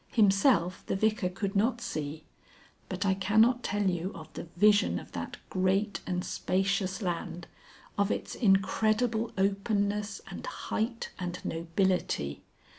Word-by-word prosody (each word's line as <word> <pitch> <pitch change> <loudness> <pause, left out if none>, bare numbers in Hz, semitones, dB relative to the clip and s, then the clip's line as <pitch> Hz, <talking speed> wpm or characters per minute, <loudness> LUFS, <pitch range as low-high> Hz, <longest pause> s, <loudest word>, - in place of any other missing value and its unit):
Himself 195 -4 +3
the - - 0
Vicar 215 -2 +1
could 195 +2 -3
not 230 +4 +2
see. 155 -9 -4 0.7
But 185 0 -2
I 190 - +4
cannot 220 +6 +3
tell 205 -3 0
you 180 +1 -1
of 160 -2 -10
the - - -6
vision 210 +2 +5
of - - -9
that - - -5
great 190 +2 +1
and 180 -1 -1
spacious 195 +2 0
land, 175 -1 -3 0.5
of 200 0 +3
its - - -2
incredible 220 +2 +2
openness, 200 +1 0
and - - -7
height, 230 - -3
and 180 -1 -3
nobility. 165 - 0
195 Hz, 130 wpm, -30 LUFS, 180-215 Hz, 0.7 s, vision